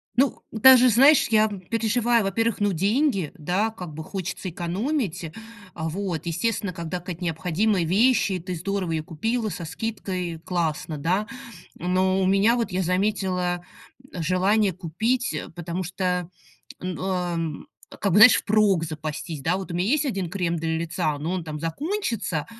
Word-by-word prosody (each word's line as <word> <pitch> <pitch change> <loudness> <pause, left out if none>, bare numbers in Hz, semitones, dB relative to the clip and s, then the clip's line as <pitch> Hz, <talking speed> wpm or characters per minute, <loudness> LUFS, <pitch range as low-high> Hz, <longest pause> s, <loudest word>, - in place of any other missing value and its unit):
Ну, 265 +1 +2
даже, 255 +2 +7
знаешь, 270 +6 +6
я 220 -1 +4
переживаю. 225 +4 0
Во-первых, 225 +4 0
ну, 205 -1 +1
деньги, 200 - +1
да, 180 +8 0
как 180 -7 -8
бы 160 +1 -6
хочется 185 +1 -5
экономить. 180 - -2 0.4
Вот, 170 0 -3
естественно, 185 +3 -1
когда 170 +1 -4
какая-то 180 0 -7
необходимая 175 +4 0
вещь, 220 +4 +3
и 185 - -1
ты 180 +1 -5
здорово 185 +1 -2
её 160 -1 -1
купила 225 +9 -2
со 175 -3 -6
скидкой- 180 -3 -4
классно, 160 -3 -2
да. 180 +8 0 0.5
Но 185 +2 +1
у - - +2
меня, 195 +5 +4
вот, 230 -4 -1
я 185 +1 0
заметила 180 -1 0 0.5
желание 185 +4 +2
купить, 195 +8 -1
э, 155 - -5
потому 175 +2 -4
что, 180 -1 -2 0.5
ам, 180 -3 -3 0.3
как 200 - +1
бы, 180 - +3
знаешь, 225 -1 +10
впрок 205 -4 +2
запастись, 155 -1 -5
да? 165 +6 +1
Вот 190 -2 -6
у - - -3
меня 175 - +1
есть 300 +3 +2
1 195 - -2
крем 175 -2 -1
для 160 0 -1
лица, 160 -2 -1
но 155 +5 -3
он 185 -2 -2
там 155 -1 -6
закончится, 230 - -2
185 Hz, 155 wpm, -24 LUFS, 170-215 Hz, 0.5 s, знаешь